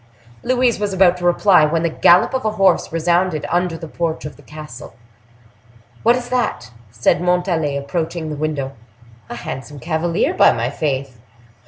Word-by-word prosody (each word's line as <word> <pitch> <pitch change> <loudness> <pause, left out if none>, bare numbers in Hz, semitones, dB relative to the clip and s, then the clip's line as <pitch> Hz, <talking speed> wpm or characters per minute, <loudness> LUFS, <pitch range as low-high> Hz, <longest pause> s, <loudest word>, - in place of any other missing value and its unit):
Louise 250 -3 +1
was 205 -1 -2
about 185 -2 +4
to 180 - -9
reply, 175 -1 +4
when 160 +2 +1
the 170 - +1
gallop 175 +7 +4
of 260 - -1
a 215 -1 -1
horse 195 -4 +2
resounded 170 -1 0
under 175 -1 0
the 165 - -8
porch 165 0 -3
of 150 - -7
the - - -17
castle. 150 -5 -11 1.1
"What 235 +2 +4
is 245 -1 -5
that?" 245 - -2 0.2
said 115 +8 +1
Montalais, 175 -5 0
approaching 160 +2 -4
the - - -4
window. 145 -3 -3 0.6
"A - - -6
handsome 135 +4 -7
cavalier, 170 - -1
by - - +5
my 120 +2 -2
faith!" 135 -4 -3
165 Hz, 165 wpm, -19 LUFS, 150-180 Hz, 1.1 s, by